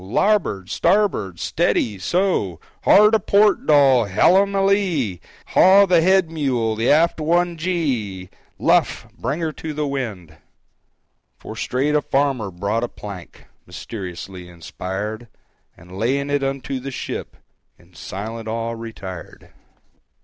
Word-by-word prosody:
"Labbord!—stabbord!—s 105 - 0
t - - -1
e - - +6
a - - +3
d 110 - 0
y!—so!—Hard 180 - +2
a 220 - +4
port, 205 +2 +2
Dol!—hellum 145 - +4
a 195 0 +2
lee! 170 - 0 0.3
Haw 195 +2 +6
the 175 -3 +3
head 185 -1 +3
mule!—the 120 -7 -1
aft 165 +3 +3
one 170 +2 +1
gee! 130 - -3 0.3
Luff!—bring 140 +8 0
her 160 -1 -1
to 155 0 -7
the 150 0 -1
wind!" 105 - -5 1.0
For 110 - -9
straight 130 +6 -1
a 150 - +3
farmer 135 -7 0
brought 100 +6 -2
a - - -1
plank,—(Mysteriously 95 -1 -9
inspired)—And 95 +1 -9
laying 135 +7 -1
it 145 -1 +1
unto 135 -1 -3
the 135 +2 -6
ship, 130 - -6 0.4
In - - -24
silent 110 +4 -7
awe 115 +1 -3
retired. 110 -6 -9
130 Hz, 120 wpm, -21 LUFS, 100-165 Hz, 1.0 s, e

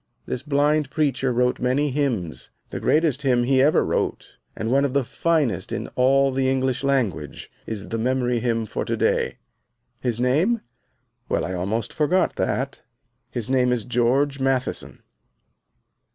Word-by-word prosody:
This 125 - -3
blind 145 0 +1
preacher 135 -3 0
wrote 125 +1 +1
many 135 +4 +1
hymns. 125 - -2 0.2
The - - -4
greatest 155 -3 +2
hymn 125 -4 +2
he 130 +1 +3
ever 150 +3 +4
wrote, - - -2 0.2
and 110 +1 -3
one 140 +2 +4
of 140 -1 -1
the 140 - +3
finest 150 +1 0
in - - -3
all 135 +2 +3
the 130 0 +1
English 130 0 0
language, 110 - -1 0.2
is 105 -2 -5
the 115 - -2
Memory 125 0 +1
Hymn 115 -1 0
for - - -3
to - - -2
day. - - +1 0.6
His 120 -2 -2
name? 160 - +2 0.7
Well, - - 0
I 95 - -4
almost 100 +6 -2
forgot 175 +4 +1
that. 135 +2 -2 0.5
His 120 -3 -3
name 125 -1 +2
is 120 -4 -1
George 130 +4 +1
Matheson. 135 -1 -2
130 Hz, 150 wpm, -23 LUFS, 120-140 Hz, 0.7 s, ever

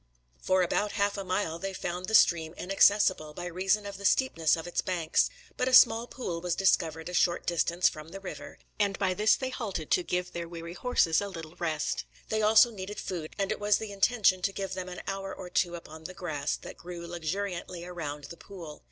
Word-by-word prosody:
For 185 0 +3
about 205 +4 0
half 200 -1 +1
a 200 - -4
mile 185 -3 -1
they 195 +2 -4
found 180 0 -4
the 220 - +2
stream 165 -4 +4
inaccessible, 190 -5 +3
by 175 - -5
reason 190 +4 0
of 200 -1 -6
the 200 - -10
steepness 165 - +3
of 160 - -6
its 175 - -1
banks; 170 -3 +1 0.3
but 255 - 0
a 260 - 0
small 230 -1 +7
pool 180 -12 -5
was 180 -1 -1
discovered 165 -4 +1
a 180 - -6
short 175 0 +2
distance 175 +1 +2
from 155 -1 -5
the 195 +3 -8
river, 150 -7 -8 0.2
and 200 -1 +1
by 190 -2 +1
this 210 +3 +4
they 260 -1 -4
halted 195 -11 -4
to - - +4
give 180 0 -2
their 170 0 -5
weary 170 0 -7
horses 180 -7 +2
a 200 - -3
little 165 -4 -8
rest. 155 -3 -2 0.2
These 220 0 +1
also 220 +2 +6
needed 205 -1 -6
food; 165 -4 -5
and 195 -1 0
it - - -2
was 205 0 +3
the 220 -2 -6
intention 200 -2 +3
to 195 - +1
give 195 -1 -4
them 185 -1 -5
an 180 - -8
hour 195 0 -4
or 180 - -9
two 175 -1 +1
upon 160 -1 -11
the 185 - -7
grass 150 -6 -2
that - - -10
grew 175 -1 -8
luxuriantly 175 +1 -4
around 150 -5 -5
the 170 +4 -9
pool. 170 -7 -10
180 Hz, 215 wpm, -29 LUFS, 170-200 Hz, 0.3 s, small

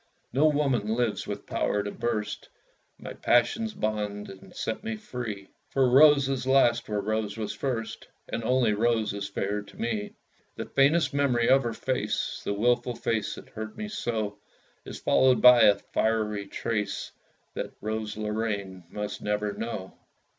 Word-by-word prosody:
No 145 +5 +4
woman 130 -8 +1
lives 120 -3 -1
with - - -5
power 105 0 0
to 100 - -4
burst 110 -3 -3 0.5
My - - -8
passion's 210 - +2
bonds, 105 -1 -3
and 95 - -14
set 110 - -3
me 225 0 -3
free; 120 - -6 0.2
For 135 -1 +3
Rose 140 0 +7
is 135 -1 -2
last 120 -4 +3
where 105 -1 0
Rose 110 +1 -2
was 110 -2 -3
first, 120 -5 -4 0.2
And 115 - -4
only 125 -2 +2
Rose 110 0 +1
is 100 -1 -4
fair 100 +1 -2
to 105 - -15
me. 110 -3 -2 0.4
The - - -5
faintest 145 +4 +3
memory 130 -5 +2
of 135 +1 +6
her 120 -3 -3
face, 130 +3 -2
The - - -1
wilful 120 +3 +1
face 110 -2 -1
that - - -12
hurt 110 -1 -7
me 215 0 -4
so, 110 - -3 0.5
Is - - -7
followed 130 -1 +4
by 125 -2 +8
a 100 - +7
fiery 105 -1 -1
trace 105 -1 -3 0.4
That - - -5
Rose 110 0 -3
Lorraine 105 -4 -3
must 105 +1 -5
never 105 0 -1
know. 110 -5 -6
110 Hz, 160 wpm, -27 LUFS, 105-125 Hz, 0.5 s, by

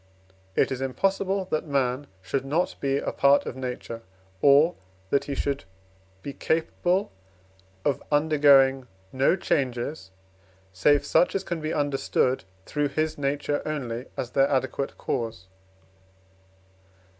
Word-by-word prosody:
It - - +2
is 130 0 -3
impossible, 195 +7 0
that 155 +1 -1
man 135 -1 0 0.2
should 135 +7 -2
not 150 +6 0
be 135 0 0
a - - -2
part 140 +1 +4
of - - -5
Nature, 125 -3 -5 0.4
or 145 +5 +6 0.4
that 140 - +2
he 140 - -3
should 140 0 -2 0.6
be 140 - -5
capable 175 +6 0 0.7
of 140 -3 +1
undergoing 140 -3 +4 0.3
no 135 +6 +3
changes, 130 - -2 0.6
save 145 +10 +3
such 180 - +3
as 195 - 0
can 170 -4 -4
be 155 +1 -2
understood 135 - 0 0.2
through 145 -1 0
his 155 +2 -2
nature 145 +1 -1
only 125 -5 -4
as 125 - -4
their 135 +1 +3
adequate 135 0 -1
cause. 115 -6 -3
140 Hz, 125 wpm, -26 LUFS, 130-155 Hz, 0.7 s, or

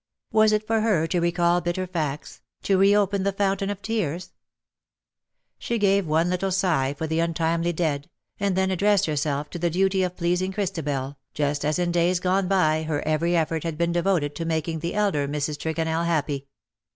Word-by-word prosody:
Was 215 0 +5
it 215 0 +1
for 225 0 +1
her 205 -8 +2
to 175 +2 0
recall 175 0 +2
bitter 175 +2 -2
facts 155 -5 -4
— - - -48
to 195 - +2
reopen 200 0 +3
the 200 +1 +1
fountain 195 0 0
of 205 -1 -5
tears? 185 -6 -2 1.3
She 235 - -2
gave 200 -3 +2
one 160 +3 +2
little 180 +2 -1
sigh 165 -8 +1
for 160 - -3
the 160 +1 -1
untimely 165 0 0
dead 155 -3 -2
— - - -47
and 200 -2 0
then 190 0 +1
addressed 200 +1 +3
herself 150 -1 -2
to 175 - -5
the 170 +1 +1
duty 190 +3 +1
of 180 -1 -2
pleasing 180 +2 0
Christabel^ 145 -8 -3 0.2
just 145 -1 -1
as 150 +1 0
in 175 -1 0
days 175 +1 +2
gone 185 +1 +1
by 160 -5 +2
her 155 -2 -2
every 170 +3 +1
effort 160 -1 0
had 165 -2 -3
been 170 +1 +1
devoted 170 -4 +1
to 165 - -3
making 160 0 -2
the 170 +5 -4
elder 195 -9 +1
Mrs. 150 +1 -2
Tregonell 160 +1 -1
happy. 145 -4 -1
170 Hz, 190 wpm, -24 LUFS, 155-190 Hz, 1.3 s, Was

